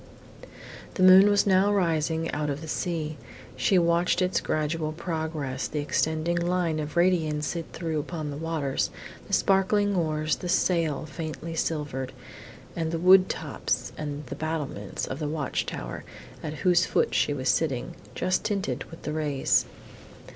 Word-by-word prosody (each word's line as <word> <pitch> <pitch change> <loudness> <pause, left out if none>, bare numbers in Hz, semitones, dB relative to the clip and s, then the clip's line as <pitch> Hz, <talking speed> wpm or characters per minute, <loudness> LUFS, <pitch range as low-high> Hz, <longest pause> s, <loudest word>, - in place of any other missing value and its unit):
The 185 - +1
moon 190 +2 +9
was 205 -1 +3
now 195 +1 +4
rising 165 -4 +1
out 150 0 -2
of 145 +1 -3
the 160 - -7
sea. 155 -2 -2 0.4
She 130 +9 +2
watched 170 +1 +2
its 185 0 +1
gradual 155 0 -1
progress, 155 -5 -3
the 150 - -5
extending 160 +3 0
line 175 -2 0
of 150 +2 -5
radiance 160 -4 +2
it 165 -1 -3
threw 160 -2 -2
upon 155 -1 -4
the 140 - -5
waters, 155 -4 -1 0.4
the - - -8
sparkling 200 +1 +3
oars, 155 -3 0
the 180 - -5
sail 165 -4 +1
faintly 160 +1 -6
silvered, 145 -5 -2 0.6
and 160 -1 -2
the 165 - -1
wood 185 +2 +6
tops 130 -4 -2
and 145 -1 -5
the 135 - -6
battlements 145 -9 -3
of 130 - -5
the 150 - -2
watch 150 -2 -2
tower, - - -5 0.4
at 155 -1 -5
whose 180 0 +4
foot - - +1
she - - +2
was 130 -3 -1
sitting, 130 -1 0 0.2
just 185 - 0
tinted 200 -2 -2
with 165 - -13
the 150 - -3
rays. 150 -3 +1
160 Hz, 155 wpm, -27 LUFS, 150-175 Hz, 0.6 s, moon